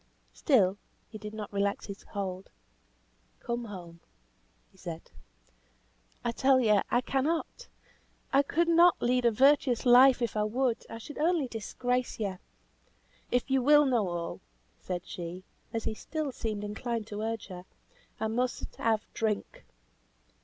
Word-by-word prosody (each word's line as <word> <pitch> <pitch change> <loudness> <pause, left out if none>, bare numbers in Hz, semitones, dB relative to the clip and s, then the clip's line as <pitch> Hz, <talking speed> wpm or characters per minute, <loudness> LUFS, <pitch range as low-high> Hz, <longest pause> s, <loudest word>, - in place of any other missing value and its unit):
Still 205 - +3 0.3
he 215 - -9
did 210 0 -7
not 210 -1 -7
relax 200 0 0
his 200 -1 -8
hold. 190 -2 -5 0.9
"Come 235 0 -3
home," 175 -5 -9 0.7
he 190 - -25
said. 170 -2 -8 1.1
"I 235 - +1
tell 265 +2 +4
you, 210 -5 +4
I 245 - +2
cannot. 315 - -2 0.7
I 275 - +6
could 330 +4 0
not 340 +1 +5
lead 250 0 +1
a 235 - +5
virtuous 265 +1 +3
life 250 +1 +7
if 230 - -2
I 210 - +1
would. 235 +2 -1
I 225 - -6
should 290 +7 -9
only 320 -3 +2
disgrace 245 +2 -2
you. 195 -4 -3 0.9
If 245 +2 0
you 265 -1 +3
will 295 +3 +6
know 240 -7 +2
all," 170 -1 -4 0.4
said 180 -1 -5
she, 175 +1 -7 0.3
as 225 - -3
he - - -2
still 305 +5 -4
seemed 215 -4 -4
inclined 225 +2 -3
to 210 0 -6
urge 225 -1 -3
her, 180 -1 -8 0.5
"I - - -1
must 245 +3 -2
have 220 -1 +1
drink. 215 -2 -2
230 Hz, 145 wpm, -30 LUFS, 205-260 Hz, 1.1 s, life